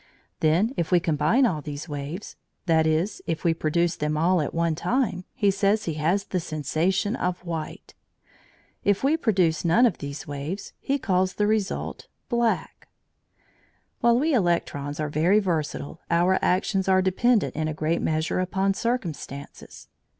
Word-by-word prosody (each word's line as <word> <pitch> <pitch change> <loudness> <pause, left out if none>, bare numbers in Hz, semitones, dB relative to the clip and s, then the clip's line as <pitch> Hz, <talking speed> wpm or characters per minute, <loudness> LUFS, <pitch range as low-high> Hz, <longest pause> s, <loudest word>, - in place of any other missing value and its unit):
Then 175 +10 +2
if 170 - -1
we 180 - +6
combine 165 - +2
all 160 -10 0
these 145 +2 -6
waves 145 +6 -6 0.3
that 160 -2 +3
is, 165 +6 0
if 165 -1 -2
we 170 - +3
produce 165 +2 0
them 150 0 -1
all 175 +2 +3
at 145 - -2
one 170 -1 0
time 185 - -1
he 205 -6 +3
says 200 +2 +1
he 165 - -2
has 165 +6 +1
the 185 - -2
sensation 170 - -1
of 180 -2 -3
white. 165 -2 -6 0.9
If 205 +2 +1
we 285 +4 +4
produce 185 - +1
none 180 +9 +4
of 220 -8 +1
these 140 0 -6
waves, 145 +7 -5
he 275 - 0
calls 185 -6 0
the 210 - +1
result 210 -2 -2 0.2
black. 230 -8 -1 1.1
While 235 0 +4
we 310 +3 +1
electrons 170 - 0
are 150 - -1
very 160 +7 +3
versatile, 160 -6 -2
our 175 +2 +3
actions 190 +1 +1
are 185 0 +4
dependent 215 +4 +2
in 155 0 -1
a 155 - -2
great 155 +2 0
measure 160 +3 0
upon 190 +2 0
circumstances. 175 - -5
175 Hz, 155 wpm, -25 LUFS, 155-200 Hz, 1.1 s, we